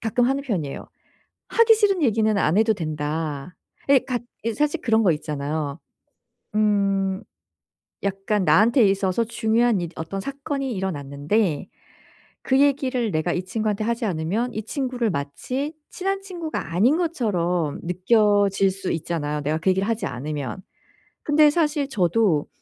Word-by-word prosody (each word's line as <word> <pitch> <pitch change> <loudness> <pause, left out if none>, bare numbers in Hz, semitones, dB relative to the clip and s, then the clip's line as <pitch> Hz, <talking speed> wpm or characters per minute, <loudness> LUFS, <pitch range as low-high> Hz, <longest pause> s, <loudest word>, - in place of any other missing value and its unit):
가끔 240 +2 +1
하는 275 +1 0
편이에요. 180 - -3 0.6
"하기 460 -1 +5
싫은 400 -5 +2
얘기는 220 -3 +2
안 180 +1 +2
해도 220 0 +3
된다." 155 -1 -4 0.3
예 280 -1 +7
같 245 -2 -2 0.2
이제 230 -1 -1
사실 295 +3 0
그런 225 -1 +2
거 185 -5 +4
있잖아요. 150 -1 -3 0.8
음. 200 -2 +1 0.8
약간 200 +1 0
나한테 230 +6 +5
있어서 195 +2 +1
중요한 230 -1 +1
이 175 - -3
어떤 165 +5 -5
사건이 275 +1 -4
일어났는데 155 -1 -1 0.8
그 265 0 +2
얘기를 265 -5 +2
내가 155 +2 0
이 180 - -2
친구한테 215 0 -1
하지 235 +1 -1
않으면 195 +7 -1
이 215 - -4
친구를 250 -2 -2
마치 250 - -3 0.2
친한 390 +1 -2
친구가 340 - -5
아닌 240 - +4
것처럼 180 - -1
느껴질 195 +1 +3
수 190 0 -4
있잖아요 150 -2 -2
내가 150 +2 0
그 165 - +1
얘기를 190 +2 0
하지 230 0 -1
않으면. 140 +4 -5 0.6
근데 300 0 +5
사실 300 -3 +1
저도 185 - +2
210 Hz, 300 characters per minute, -23 LUFS, 170-250 Hz, 0.8 s, 예